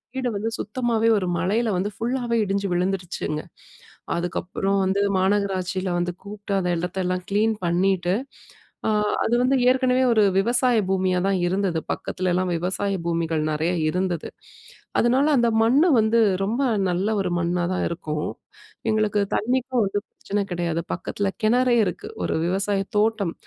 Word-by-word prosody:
வீட 260 Hz, -1 st, -2 dB
வந்து 225 Hz, +3 st, -2 dB
சுத்தமாவே 230 Hz, 0 st, 0 dB
ஒரு 185 Hz, -, -3 dB
மழையில 215 Hz, +6 st, +1 dB
வந்து 200 Hz, +3 st, -1 dB
ஃபுல்லாவே 240 Hz, 0 st, -1 dB
இடிஞ்சு 200 Hz, 0 st, -1 dB
விழுந்துருச்சுங்க. 175 Hz, -4 st, -2 dB, 0.8 s
அதுக்கப்புறம் 185 Hz, +3 st, -1 dB
வந்து 190 Hz, +1 st, +1 dB, 0.2 s
மாநகராட்சில 190 Hz, -1 st, 0 dB
வந்து 175 Hz, 0 st, -1 dB
கூப்புட்டு. 205 Hz, 0 st, -6 dB
அந்த 180 Hz, -1 st, -1 dB
இடத்தெல்லாம் 180 Hz, +1 st, -2 dB
கிளீன் 215 Hz, +2 st, +2 dB
பண்ணீட்டு, 180 Hz, +1 st, +1 dB, 0.7 s
அ -, -, +2 dB, 0.3 s
அது 240 Hz, -, +1 dB
வந்து 265 Hz, +2 st, +3 dB
ஏற்கனவே 255 Hz, 0 st, +2 dB
ஒரு 215 Hz, -2 st, +4 dB, 0.2 s
விவசாய 245 Hz, +3 st, +2 dB
பூமியாதான் 190 Hz, 0 st, +1 dB
இருந்தது. 185 Hz, -3 st, 0 dB
பக்கத்துலலாம் 185 Hz, 0 st, -1 dB
விவசாய 190 Hz, +4 st, -1 dB
பூமிகள் 165 Hz, -2 st, 0 dB
நெறையா 160 Hz, +4 st, 0 dB, 0.2 s
இருந்தது. 180 Hz, -1 st, -2 dB, 0.7 s
அதனால 255 Hz, +4 st, +3 dB
அந்த 235 Hz, 0 st, +3 dB
மண்ண 250 Hz, +7 st, +4 dB, 0.2 s
வந்து 220 Hz, +2 st, +3 dB, 0.2 s
ரொம்ப 230 Hz, +7 st, -1 dB, 0.3 s
நல்ல 180 Hz, +4 st, 0 dB
ஒரு 185 Hz, -, -1 dB
மண்ணாதான் 175 Hz, +1 st, 0 dB
இருக்கும். 155 Hz, -3 st, -3 dB, 0.6 s
எங்களுக்கு 215 Hz, -1 st, +1 dB
தண்ணிக்கும் 255 Hz, +1 st, 0 dB
வந்து 200 Hz, +1 st, -1 dB
பிரச்சன 205 Hz, 0 st, -3 dB
கிடையாது. 170 Hz, -1 st, -1 dB
பக்கத்துல 195 Hz, +2 st, -2 dB
கிணறே 245 Hz, +2 st, +3 dB
இருக்கு. 180 Hz, -, -5 dB
ஒரு -, -, -1 dB
விவசாய 195 Hz, +2 st, 0 dB, 0.2 s
தோட்டம். 210 Hz, -5 st, +1 dB
195 Hz, 130 wpm, -23 LUFS, 180-225 Hz, 0.8 s, ஒரு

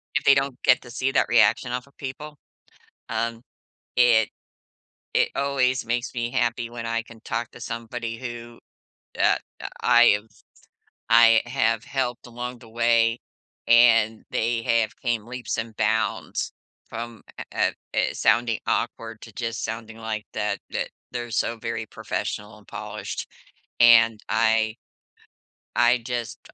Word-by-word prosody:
If -, -, +1 dB
they 140 Hz, -, +7 dB
don't 135 Hz, -2 st, -1 dB
get 125 Hz, -, +5 dB
to 120 Hz, -, -12 dB
see 130 Hz, +2 st, -1 dB
that -, -, +2 dB
reaction 120 Hz, -, +4 dB
off 125 Hz, +2 st, -4 dB
of 140 Hz, -, -25 dB
people, 145 Hz, +2 st, -7 dB, 0.7 s
um, 115 Hz, 0 st, -2 dB, 0.5 s
it 120 Hz, -3 st, +5 dB, 0.8 s
it -, -, +3 dB
always 135 Hz, -3 st, +1 dB
makes 120 Hz, +1 st, -2 dB
me 120 Hz, -1 st, -2 dB
happy 120 Hz, -2 st, 0 dB
when 115 Hz, -1 st, -6 dB
I 115 Hz, 0 st, -1 dB
can 115 Hz, -1 st, -15 dB
talk 115 Hz, 0 st, -3 dB
to -, -, -13 dB
somebody 115 Hz, 0 st, -5 dB
who, 120 Hz, -1 st, -8 dB, 0.6 s
uh, -, -, +4 dB, 0.5 s
I 120 Hz, -3 st, +6 dB
I've 105 Hz, +1 st, -19 dB, 0.7 s
I 115 Hz, -1 st, +7 dB
have 115 Hz, -3 st, +1 dB
helped 125 Hz, -3 st, -3 dB
along 120 Hz, 0 st, -6 dB
the 115 Hz, -, -15 dB
way, 115 Hz, 0 st, +2 dB, 0.5 s
and 115 Hz, -2 st, +5 dB
they 115 Hz, 0 st, 0 dB
have 115 Hz, -1 st, +1 dB
came 120 Hz, -4 st, -1 dB
leaps 125 Hz, +1 st, -4 dB
and 110 Hz, 0 st, -4 dB
bounds 110 Hz, +1 st, 0 dB, 0.4 s
from 115 Hz, -1 st, -7 dB, 0.2 s
uh -, -, -4 dB
uh -, -, -8 dB, 0.4 s
uh -, -, +3 dB
uh, -, -, +1 dB
sounding 115 Hz, -1 st, +2 dB
awkward 115 Hz, -1 st, -2 dB
to 115 Hz, -, -11 dB
just 115 Hz, -1 st, -3 dB
sounding 115 Hz, 0 st, -5 dB
like 110 Hz, -1 st, -4 dB
that -, -, -1 dB
that -, -, -2 dB, 0.2 s
they're 120 Hz, -1 st, -5 dB
so 115 Hz, 0 st, 0 dB
very 115 Hz, 0 st, -4 dB
professional 105 Hz, +1 st, -4 dB
and 105 Hz, -, -20 dB
polished. -, -, -6 dB, 0.5 s
And 115 Hz, -2 st, +7 dB
I 110 Hz, 0 st, +2 dB, 1.0 s
I 120 Hz, +1 st, +5 dB
just 120 Hz, 0 st, -4 dB
115 Hz, 145 wpm, -24 LUFS, 115-120 Hz, 1.0 s, they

